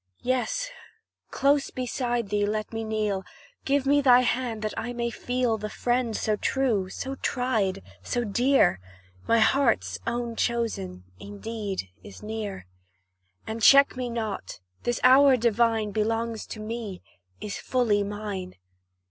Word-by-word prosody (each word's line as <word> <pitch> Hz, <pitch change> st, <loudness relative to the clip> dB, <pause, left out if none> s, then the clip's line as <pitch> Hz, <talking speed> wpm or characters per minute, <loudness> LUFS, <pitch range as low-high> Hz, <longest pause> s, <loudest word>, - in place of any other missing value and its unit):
Yes, -, -, 0 dB, 0.6 s
close 280 Hz, 0 st, +2 dB
beside 240 Hz, -3 st, -2 dB
thee 205 Hz, 0 st, +1 dB
let 215 Hz, +1 st, -2 dB
me 225 Hz, 0 st, -3 dB
kneel 215 Hz, -3 st, -1 dB, 0.4 s
Give 280 Hz, 0 st, +1 dB
me 285 Hz, +1 st, +4 dB
thy 250 Hz, -2 st, +6 dB
hand, 240 Hz, -3 st, -1 dB
that 215 Hz, -, -2 dB
I 245 Hz, +1 st, -4 dB
may 235 Hz, -1 st, -2 dB
feel 245 Hz, -1 st, -1 dB
The 210 Hz, +1 st, -4 dB
friend 240 Hz, 0 st, 0 dB
so 215 Hz, -1 st, 0 dB
true 225 Hz, -7 st, 0 dB
so 265 Hz, +7 st, -5 dB
tried 245 Hz, -, -1 dB, 0.2 s
so 240 Hz, -, -2 dB
dear, 240 Hz, -, +3 dB, 0.5 s
My 230 Hz, -, +4 dB
heart's 220 Hz, -, +2 dB
own 235 Hz, 0 st, -2 dB
chosen 220 Hz, -, -2 dB, 0.2 s
indeed 205 Hz, -, -5 dB
is 95 Hz, -, -12 dB
near; 210 Hz, -, -5 dB, 0.8 s
And 225 Hz, +1 st, -5 dB
check 275 Hz, +4 st, +7 dB
me 250 Hz, -1 st, -3 dB
not 225 Hz, -, -4 dB, 0.2 s
this 240 Hz, 0 st, -1 dB
hour 265 Hz, +1 st, +7 dB
divine 225 Hz, -2 st, +2 dB
Belongs 225 Hz, +1 st, -1 dB
to 215 Hz, -, -7 dB
me 215 Hz, -3 st, -6 dB, 0.4 s
is 210 Hz, -1 st, -5 dB
fully 230 Hz, -5 st, +1 dB
mine. 200 Hz, -2 st, -5 dB
230 Hz, 135 wpm, -26 LUFS, 210-250 Hz, 0.8 s, check